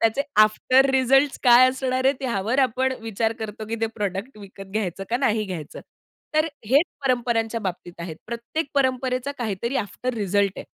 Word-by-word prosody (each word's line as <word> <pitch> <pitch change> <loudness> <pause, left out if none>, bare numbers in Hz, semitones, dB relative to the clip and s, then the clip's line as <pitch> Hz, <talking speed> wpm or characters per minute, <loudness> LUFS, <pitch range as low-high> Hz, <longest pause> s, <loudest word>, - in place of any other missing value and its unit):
त्याचे 225 +5 +2 0.2
after 255 +5 +4
results 270 +2 +3
काय 250 0 +7
असणार 260 0 -1
आहे 270 - +5
त्यावर 235 -1 -1
आपण 260 +1 +1
विचार 225 0 -1
करतो, 215 -1 -6
की 225 - -2
ते 225 - +2
प्रॉडक्ट 205 +4 -4
विकत 195 -1 -11
घ्यायचं 195 -3 -2
का 240 - +2
नाही 225 -5 +1
घ्यायचं. 170 -6 -7 0.5
तर 310 +1 +3 0.2
हेच 275 +8 +4 0.2
परंपरांच्या 235 -3 0
बाबतीत 180 -3 -6
आहेत. 170 -2 -6
प्रत्येक 235 +8 -4
परंपरेचा 260 0 0
काहीतरी 235 +2 -2
आफ्टर 245 +3 -3
रिजल्ट 200 -2 +1
आहे. - - -8
235 Hz, 160 wpm, -23 LUFS, 205-260 Hz, 0.5 s, काय